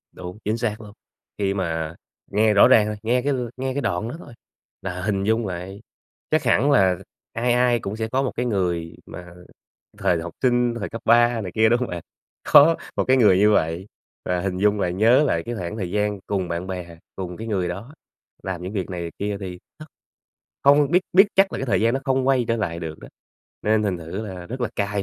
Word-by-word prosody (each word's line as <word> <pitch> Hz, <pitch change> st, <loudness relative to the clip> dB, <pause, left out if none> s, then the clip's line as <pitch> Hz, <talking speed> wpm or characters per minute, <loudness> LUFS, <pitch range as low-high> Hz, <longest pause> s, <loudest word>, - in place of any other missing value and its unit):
Đúng, 90 Hz, +2 st, -8 dB
chính 110 Hz, +2 st, 0 dB
xác 115 Hz, -2 st, -2 dB
luôn. 105 Hz, -2 st, -11 dB, 0.5 s
Khi 100 Hz, -1 st, 0 dB
mà 80 Hz, -4 st, -3 dB, 0.4 s
nghe 105 Hz, +1 st, +3 dB
rõ 100 Hz, -, +7 dB
ràng 105 Hz, -2 st, +5 dB
rồi, 105 Hz, -, -3 dB
nghe 120 Hz, +3 st, +1 dB
cái 140 Hz, +2 st, 0 dB, 0.2 s
nghe 130 Hz, 0 st, -2 dB
cái 140 Hz, -, -2 dB
đoạn 90 Hz, 0 st, -1 dB
đó 150 Hz, -, -6 dB
thôi 120 Hz, -, -12 dB, 0.5 s
là 90 Hz, -1 st, -5 dB
hình 95 Hz, 0 st, -1 dB
dung 110 Hz, +1 st, +1 dB
lại. 95 Hz, +3 st, -6 dB, 0.5 s
Chắc -, -, +2 dB
hẳn 140 Hz, +7 st, +3 dB
là 95 Hz, -8 st, +4 dB, 0.4 s
ai 120 Hz, +2 st, +1 dB
ai 125 Hz, -1 st, +3 dB
cũng 100 Hz, -1 st, -5 dB
sẽ 110 Hz, 0 st, -3 dB
có 130 Hz, +4 st, 0 dB
một 130 Hz, -, -1 dB
cái 125 Hz, -, -1 dB
người 90 Hz, -7 st, -1 dB
mà 90 Hz, -1 st, -10 dB, 0.7 s
thời 85 Hz, -2 st, +1 dB
học 85 Hz, 0 st, -7 dB
sinh, 120 Hz, -2 st, +2 dB
thời 105 Hz, -, -4 dB
cấp 115 Hz, -, -7 dB
3 120 Hz, 0 st, +4 dB
này 95 Hz, -4 st, -6 dB
kia, 110 Hz, 0 st, +4 dB
đúng 120 Hz, +2 st, +3 dB
hông 125 Hz, -, -2 dB
bạn? 85 Hz, -1 st, -5 dB, 0.5 s
Có 160 Hz, +3 st, +8 dB, 0.2 s
một -, -, +1 dB
cái 130 Hz, -, +3 dB
người 105 Hz, -7 st, +5 dB
như 105 Hz, +2 st, +5 dB
vậy 85 Hz, 0 st, 0 dB, 0.4 s
và 90 Hz, 0 st, -1 dB
hình 95 Hz, 0 st, -2 dB
dung 105 Hz, +1 st, +2 dB
lại, 90 Hz, -2 st, 0 dB
nhớ 115 Hz, +9 st, +4 dB
lại 85 Hz, -, +1 dB
cái 120 Hz, -, -3 dB
khoảng 95 Hz, -1 st, -5 dB
thời 95 Hz, -5 st, -4 dB
gian 105 Hz, +1 st, -1 dB
cùng 95 Hz, -3 st, -2 dB
bạn 85 Hz, +1 st, -3 dB
bè, 90 Hz, -3 st, -7 dB, 0.2 s
cùng 90 Hz, -2 st, -5 dB
cái 115 Hz, -, -7 dB
người 95 Hz, -5 st, -1 dB
đó, 100 Hz, -, -7 dB, 0.5 s
làm 95 Hz, -2 st, -4 dB
những 90 Hz, +2 st, -5 dB
việc 95 Hz, -4 st, -3 dB
này 90 Hz, -2 st, -4 dB
việc 85 Hz, -, -7 dB
kia 100 Hz, 0 st, -2 dB
thì 90 Hz, -2 st, -6 dB, 0.2 s
nó 155 Hz, -, -9 dB, 0.8 s
hông 145 Hz, 0 st, +5 dB
biết 180 Hz, +2 st, +4 dB
biết 190 Hz, +3 st, +8 dB
chắc 195 Hz, 0 st, +4 dB
là -, -, -3 dB
cái 135 Hz, -, -3 dB
thời -, -, +1 dB
gian 115 Hz, +2 st, +2 dB
nó 135 Hz, -, -1 dB
không 130 Hz, -1 st, +1 dB
quay 130 Hz, -3 st, +3 dB
trở 115 Hz, -, +1 dB
lại 85 Hz, -6 st, -3 dB
được 80 Hz, -2 st, -6 dB
đó, -, -, -11 dB, 0.5 s
nên 110 Hz, 0 st, +2 dB
thành 95 Hz, -4 st, -1 dB
thử 90 Hz, +7 st, -6 dB
là 90 Hz, -3 st, -8 dB
rất 130 Hz, +6 st, -6 dB
là 120 Hz, -, 0 dB
cay 100 Hz, 0 st, -1 dB
105 Hz, 235 wpm, -23 LUFS, 90-120 Hz, 0.8 s, Có